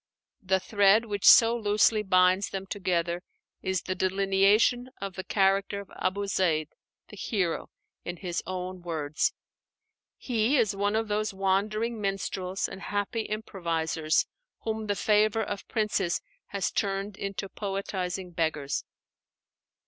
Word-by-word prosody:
The 190 Hz, 0 st, +2 dB
thread 205 Hz, +3 st, +4 dB
which 205 Hz, -3 st, -1 dB
so 230 Hz, 0 st, +8 dB
loosely 215 Hz, -1 st, +3 dB
binds 185 Hz, 0 st, +3 dB
them 195 Hz, 0 st, -5 dB
together 175 Hz, -3 st, -1 dB, 0.4 s
is 190 Hz, -1 st, -1 dB
the 185 Hz, -, -2 dB
delineation 195 Hz, +6 st, +3 dB
of 195 Hz, -1 st, -5 dB
the 190 Hz, -, -5 dB
character 195 Hz, +1 st, +1 dB
of 200 Hz, -, -10 dB
Abu 200 Hz, +2 st, -1 dB
Zeid, 165 Hz, -6 st, +1 dB, 0.4 s
the -, -, -10 dB
hero, 190 Hz, -4 st, -2 dB, 0.3 s
in 175 Hz, 0 st, -5 dB
his 175 Hz, -2 st, -3 dB
own 185 Hz, 0 st, -4 dB
words. 155 Hz, -3 st, -1 dB, 0.9 s
He 240 Hz, +3 st, +1 dB
is 220 Hz, -5 st, +2 dB
one 205 Hz, +1 st, 0 dB
of 225 Hz, 0 st, 0 dB
those 210 Hz, -1 st, -1 dB
wandering 210 Hz, +4 st, 0 dB
minstrels 195 Hz, -1 st, -2 dB
and 195 Hz, -, -9 dB
happy 205 Hz, +3 st, -2 dB
improvisers 165 Hz, -7 st, -1 dB, 0.4 s
whom 220 Hz, -1 st, -3 dB
the 205 Hz, -, +1 dB
favor 215 Hz, +3 st, +3 dB
of 205 Hz, -1 st, -5 dB
princes 210 Hz, -5 st, 0 dB, 0.3 s
had 200 Hz, -1 st, -4 dB
turned 195 Hz, 0 st, -1 dB
into 195 Hz, 0 st, -4 dB
poetizing 190 Hz, -2 st, -4 dB
beggars. 160 Hz, -4 st, -1 dB
195 Hz, 130 wpm, -28 LUFS, 185-210 Hz, 0.9 s, so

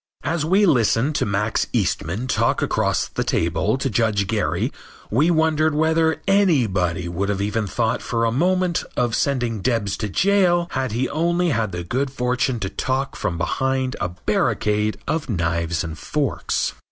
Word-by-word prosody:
As 160 Hz, +2 st, -1 dB
we 190 Hz, +6 st, +3 dB
listened 125 Hz, -, +2 dB
to -, -, 0 dB
Max 105 Hz, +2 st, 0 dB
Eastman 100 Hz, -1 st, -1 dB
talk 130 Hz, -, +1 dB
across -, -, 0 dB
the -, -, -3 dB
table 85 Hz, +8 st, 0 dB
to 135 Hz, -, -1 dB
Judge 105 Hz, -3 st, +1 dB
Gary 105 Hz, +1 st, -1 dB, 0.4 s
we 145 Hz, +10 st, +3 dB
wondered 160 Hz, -2 st, +2 dB
whether 160 Hz, +1 st, +2 dB
anybody 110 Hz, -, +2 dB
would 90 Hz, +4 st, -2 dB
have 100 Hz, -1 st, -1 dB
even 105 Hz, +1 st, -1 dB
thought 115 Hz, +3 st, -1 dB
for 115 Hz, -1 st, -1 dB
a 115 Hz, -, +1 dB
moment 180 Hz, +5 st, +1 dB
of 120 Hz, -2 st, +1 dB
sending 120 Hz, -6 st, 0 dB
Debs 110 Hz, -3 st, 0 dB
to 105 Hz, -, -3 dB
jail 175 Hz, -, +3 dB
if 130 Hz, -3 st, -1 dB
he 120 Hz, +4 st, -1 dB
had -, -, -2 dB
only 170 Hz, +3 st, +1 dB
had 115 Hz, -8 st, 0 dB
the 90 Hz, -1 st, -4 dB
good 130 Hz, +10 st, -1 dB
fortune 125 Hz, -1 st, 0 dB
to 95 Hz, -, -2 dB
talk 135 Hz, +1 st, -2 dB
from 95 Hz, -5 st, -2 dB
behind 130 Hz, +9 st, -1 dB
a 85 Hz, -, 0 dB
barricade 105 Hz, +4 st, 0 dB
of 155 Hz, -4 st, -2 dB
knives 85 Hz, -3 st, -1 dB
and 80 Hz, -2 st, -6 dB
forks. 145 Hz, -4 st, -1 dB
120 Hz, 165 wpm, -22 LUFS, 100-155 Hz, 0.4 s, we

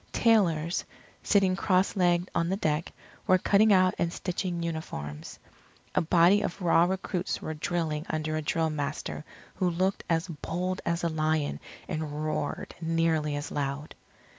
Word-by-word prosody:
Tailors, 175 Hz, -7 st, +2 dB, 0.4 s
sitting 195 Hz, -3 st, +3 dB
cross 185 Hz, 0 st, +2 dB
legged 175 Hz, -1 st, +2 dB
on 170 Hz, 0 st, +1 dB
the 190 Hz, -, 0 dB
deck, 155 Hz, -4 st, -1 dB, 0.4 s
were 185 Hz, -, +6 dB
cutting 205 Hz, +3 st, +4 dB
out 185 Hz, -1 st, +5 dB
and 170 Hz, -1 st, +1 dB
stitching 175 Hz, -1 st, -3 dB
uniforms. 75 Hz, -, -5 dB, 0.6 s
A -, -, +3 dB
body 175 Hz, +4 st, +5 dB
of 180 Hz, -, -3 dB
raw 170 Hz, -2 st, +4 dB
recruits 185 Hz, 0 st, -2 dB
were 160 Hz, -, -4 dB
drilling 155 Hz, 0 st, -2 dB
under 155 Hz, 0 st, -1 dB
a 155 Hz, -, -1 dB
drill 160 Hz, +1 st, 0 dB
master 150 Hz, 0 st, -4 dB, 0.3 s
who 185 Hz, -, 0 dB
looked 185 Hz, +3 st, 0 dB
as 165 Hz, +1 st, +1 dB
bold 180 Hz, +3 st, -3 dB
as 170 Hz, +1 st, 0 dB
a -, -, +3 dB
lion 155 Hz, -, 0 dB, 0.3 s
and 155 Hz, -1 st, -3 dB
roared 155 Hz, -1 st, -3 dB
nearly 165 Hz, -2 st, +1 dB
as 145 Hz, +1 st, -5 dB
loud. 145 Hz, +1 st, -3 dB
165 Hz, 150 wpm, -28 LUFS, 155-185 Hz, 0.6 s, were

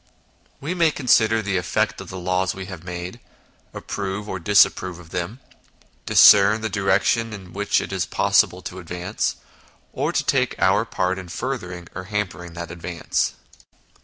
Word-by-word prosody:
We 150 Hz, +6 st, -3 dB
may 170 Hz, -3 st, +3 dB
consider 115 Hz, -6 st, +3 dB
the 95 Hz, -2 st, 0 dB
effect 100 Hz, +3 st, -1 dB
of 95 Hz, -, -10 dB
the 95 Hz, -, -7 dB
laws 90 Hz, +1 st, 0 dB
we 95 Hz, 0 st, -6 dB
have 90 Hz, -3 st, -9 dB
made, 90 Hz, +5 st, -6 dB, 0.5 s
approve 100 Hz, +1 st, -5 dB
or 95 Hz, -, -4 dB
disapprove 95 Hz, -1 st, +3 dB
of 85 Hz, -2 st, -14 dB
them, 90 Hz, +8 st, -4 dB, 0.7 s
discern 105 Hz, +2 st, +7 dB
the 110 Hz, -, -2 dB
direction 100 Hz, +3 st, +1 dB
in 95 Hz, -4 st, -10 dB
which 105 Hz, +1 st, +1 dB
it -, -, -5 dB
is 90 Hz, -5 st, -1 dB
possible -, -, +2 dB
to 95 Hz, -, -7 dB
advance, 90 Hz, +3 st, -3 dB, 0.6 s
and -, -, -1 dB
take -, -, +1 dB
our -, -, +3 dB
part 95 Hz, +1 st, -1 dB
in 90 Hz, -2 st, -9 dB
furthering 90 Hz, -6 st, -5 dB
or 95 Hz, 0 st, -6 dB
hampering 95 Hz, -4 st, -4 dB
that 85 Hz, -1 st, -7 dB
advance. 85 Hz, 0 st, -2 dB
95 Hz, 155 wpm, -22 LUFS, 90-105 Hz, 0.7 s, discern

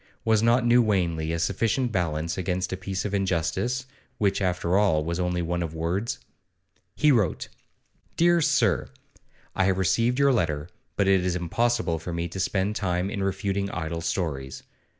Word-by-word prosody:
Was 110 Hz, -2 st, +3 dB
not 120 Hz, +2 st, +3 dB
New 120 Hz, +1 st, +5 dB
Wanley 85 Hz, -7 st, 0 dB
a 85 Hz, -, -1 dB
sufficient 115 Hz, +8 st, 0 dB
balance 85 Hz, -3 st, -1 dB
against 90 Hz, 0 st, -2 dB
a -, -, 0 dB
piece 95 Hz, +1 st, -4 dB
of 105 Hz, -, -3 dB
injustice, 95 Hz, +7 st, -1 dB, 0.3 s
which, 100 Hz, -1 st, +1 dB
after 90 Hz, -1 st, 0 dB
all, 80 Hz, -7 st, +3 dB
was 85 Hz, +1 st, -2 dB
only 90 Hz, -1 st, 0 dB
one 85 Hz, +1 st, -2 dB
of 80 Hz, -1 st, -4 dB
words? 90 Hz, +10 st, -2 dB, 0.8 s
He 150 Hz, 0 st, +4 dB
wrote: 105 Hz, -, +1 dB, 0.7 s
'DEAR 170 Hz, 0 st, +4 dB
SIR, 135 Hz, -, +2 dB, 0.7 s
I 95 Hz, -, +2 dB
have 95 Hz, -1 st, +2 dB
received 105 Hz, +7 st, +2 dB
your 140 Hz, -1 st, +4 dB
letter, 80 Hz, -7 st, -1 dB, 0.3 s
but 100 Hz, -, +1 dB
it 95 Hz, -2 st, +4 dB
is 90 Hz, -1 st, 0 dB
impossible 90 Hz, 0 st, 0 dB
for 85 Hz, +2 st, -6 dB
me 85 Hz, +1 st, -2 dB
to 95 Hz, -, -7 dB
spend 95 Hz, +2 st, 0 dB
time 90 Hz, -1 st, -1 dB
in 100 Hz, -, -3 dB
refuting 100 Hz, 0 st, -1 dB
idle 85 Hz, -2 st, -4 dB
stories. 80 Hz, -6 st, -3 dB
95 Hz, 170 wpm, -26 LUFS, 85-110 Hz, 0.8 s, New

